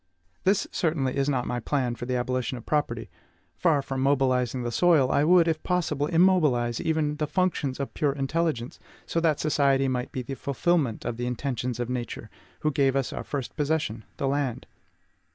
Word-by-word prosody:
This 195 Hz, +1 st, +3 dB
certainly 150 Hz, -6 st, 0 dB
is 140 Hz, +1 st, +1 dB
not 125 Hz, -3 st, 0 dB
my 125 Hz, -, -2 dB
plan 125 Hz, 0 st, -1 dB
for 120 Hz, +1 st, -7 dB
the 130 Hz, -, 0 dB
abolition 125 Hz, 0 st, -1 dB
of 120 Hz, -, -11 dB
property. 120 Hz, -7 st, -1 dB, 0.5 s
Far 155 Hz, -6 st, +2 dB
from 135 Hz, -1 st, -3 dB
mobilizing 130 Hz, -3 st, +1 dB
the 120 Hz, -, -2 dB
soil, 155 Hz, -2 st, +4 dB
I 140 Hz, -, +3 dB
would, 170 Hz, +1 st, +5 dB
if 160 Hz, -1 st, 0 dB
possible, 155 Hz, -5 st, 0 dB
immobilize 155 Hz, -10 st, +3 dB
even 155 Hz, -2 st, 0 dB
the 150 Hz, 0 st, -1 dB
functions 165 Hz, -7 st, 0 dB
of 140 Hz, -, -4 dB
pure 145 Hz, -2 st, +1 dB
intelligence, 140 Hz, -2 st, -2 dB, 0.3 s
so 165 Hz, -, -1 dB
that 160 Hz, -3 st, +2 dB
society 140 Hz, -3 st, +2 dB
might 125 Hz, 0 st, -2 dB
be 130 Hz, -, -4 dB
the 135 Hz, -, -5 dB
fulfilment 140 Hz, -2 st, 0 dB
of 115 Hz, -, -3 dB
the 120 Hz, 0 st, -2 dB
intentions 125 Hz, -1 st, -3 dB
of 120 Hz, -, -1 dB
Nature, 120 Hz, -3 st, -5 dB, 0.3 s
who 155 Hz, -, +1 dB
gave 135 Hz, -1 st, +2 dB
us 135 Hz, -2 st, -1 dB
our -, -, -4 dB
first 140 Hz, -4 st, -5 dB
possession, 150 Hz, -7 st, -1 dB
the 135 Hz, -, -1 dB
land. 135 Hz, -3 st, -1 dB
135 Hz, 185 wpm, -26 LUFS, 125-155 Hz, 0.5 s, would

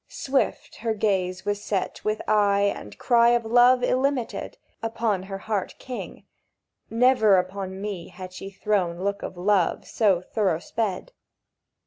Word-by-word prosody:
Swift 270 Hz, 0 st, -2 dB
her 225 Hz, -1 st, -2 dB
gaze 190 Hz, -3 st, 0 dB
was 205 Hz, 0 st, -2 dB
set 195 Hz, -3 st, -2 dB
With 215 Hz, 0 st, -1 dB
eye 200 Hz, -1 st, +3 dB
and 105 Hz, -, -10 dB
cry 235 Hz, -1 st, +4 dB
of 235 Hz, -, -7 dB
love 245 Hz, +2 st, +5 dB
illimited 260 Hz, -1 st, -1 dB, 0.2 s
Upon 225 Hz, -3 st, -1 dB
her 195 Hz, +1 st, -6 dB
Heart 200 Hz, -1 st, -3 dB
king. 255 Hz, -2 st, -8 dB, 0.6 s
Never 230 Hz, -4 st, +4 dB
upon 190 Hz, +1 st, -3 dB
me 200 Hz, -4 st, -5 dB
Had 185 Hz, 0 st, -10 dB
she 195 Hz, +1 st, -7 dB
thrown 190 Hz, -3 st, -1 dB
look 200 Hz, +1 st, -1 dB
of -, -, -6 dB
love 185 Hz, -1 st, +1 dB
so 200 Hz, -6 st, +2 dB
thorough 185 Hz, -2 st, 0 dB
sped! 215 Hz, -, -3 dB
205 Hz, 140 wpm, -25 LUFS, 190-225 Hz, 0.6 s, love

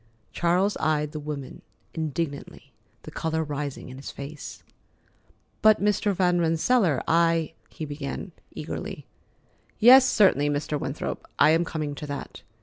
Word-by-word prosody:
Charles 180 Hz, +4 st, +1 dB
eyed 150 Hz, -1 st, 0 dB
the 155 Hz, -, -5 dB
woman 145 Hz, -3 st, -7 dB, 0.3 s
indignantly, 155 Hz, -2 st, -5 dB, 0.3 s
the -, -, -9 dB
color 160 Hz, 0 st, -2 dB
rising 145 Hz, -3 st, -5 dB
in 130 Hz, -, -9 dB
his 135 Hz, -, -8 dB
face. 140 Hz, +1 st, -9 dB, 1.0 s
"But, 215 Hz, -1 st, +6 dB
Mr. 205 Hz, +1 st, +1 dB
Van 180 Hz, -1 st, +2 dB
Rensselaer, 165 Hz, -, +2 dB
I——" 165 Hz, -1 st, +2 dB, 0.2 s
he 155 Hz, -, -7 dB
began 145 Hz, +5 st, -6 dB, 0.2 s
eagerly. -, -, -6 dB, 0.7 s
"Yes, 250 Hz, +4 st, +8 dB
certainly, 145 Hz, -8 st, +4 dB
Mr. 145 Hz, 0 st, -2 dB
Winthrop; 140 Hz, +2 st, -5 dB
I 150 Hz, -, +6 dB
am 165 Hz, +2 st, +3 dB
coming 155 Hz, -3 st, -4 dB
to 150 Hz, +1 st, -7 dB
that. 140 Hz, -1 st, -7 dB
155 Hz, 135 wpm, -25 LUFS, 145-175 Hz, 1.0 s, Yes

